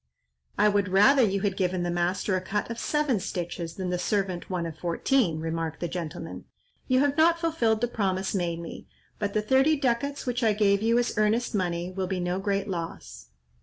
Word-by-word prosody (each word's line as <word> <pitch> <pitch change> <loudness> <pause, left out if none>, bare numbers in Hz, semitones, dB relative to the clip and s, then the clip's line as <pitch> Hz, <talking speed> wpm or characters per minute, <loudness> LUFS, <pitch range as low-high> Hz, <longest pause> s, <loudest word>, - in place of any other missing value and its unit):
"I 210 - +5
would 205 -1 +2
rather 205 +9 +5
you 200 -4 +2
had 200 -2 0
given 185 -2 0
the 175 - -1
master 180 +3 0
a 185 - -1
cut 205 +4 -3
of 230 - -5
seven 295 -7 +1
stitches 175 -3 -4
than 185 -2 -3
the 180 - -1
servant 190 -2 -1
one 180 -2 -2
of 165 -2 -5
fourteen," 175 - +1
remarked 165 0 -3
the 175 - -2
gentleman. 170 -3 -6 0.4
"You 255 0 +3
have 285 0 +1
not 335 +1 +5
fulfilled 245 -10 +1
the 240 - +2
promise 195 -4 -1
made 175 -4 -1
me, 170 - -8 0.3
but 200 -1 -2
the 215 - +1
thirty 265 +7 +4
ducats 275 +1 -1
which 245 0 -1
I 220 -2 +4
gave 200 -1 +2
you 230 +2 +3
as 245 0 0
earnest 220 +4 +1
money, 175 -3 -1
will 185 0 -3
be 190 0 -2
no 180 +1 -1
great 200 0 -1
loss." 170 - -6
195 Hz, 205 wpm, -27 LUFS, 180-235 Hz, 0.4 s, I